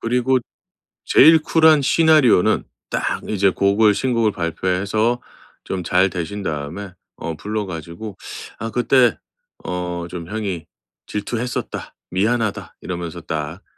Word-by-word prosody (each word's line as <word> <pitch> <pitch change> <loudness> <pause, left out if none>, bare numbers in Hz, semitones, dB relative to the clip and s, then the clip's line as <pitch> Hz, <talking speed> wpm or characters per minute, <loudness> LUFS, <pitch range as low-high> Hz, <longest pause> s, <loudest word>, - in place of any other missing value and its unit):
그리고 125 +2 +2 0.7
제일 160 +1 +7
쿨한 160 -2 +5
시나리오는 155 - +4 0.3
딱 - - -1
이제 100 -2 +3
곡을 100 +3 +3
신곡을 115 -2 +1
발표해서 95 +7 0 0.4
좀 95 -1 -3
잘 90 +3 +3
되신 90 +3 -4
다음에 85 +4 -4 0.2
어 80 0 -5
불러 105 +5 -3
가지고 85 +4 -7 0.4
"아 115 +1 -4
그때 125 0 +3 0.5
어 90 -1 -3
좀 85 -2 -7
형이 100 -6 -4 0.4
질투했었다. 120 +4 -4 0.2
미안하다." 110 +3 -1
이러면서 85 -1 -5
딱 80 +3 -5
100 Hz, 255 characters per minute, -21 LUFS, 90-115 Hz, 0.7 s, 제일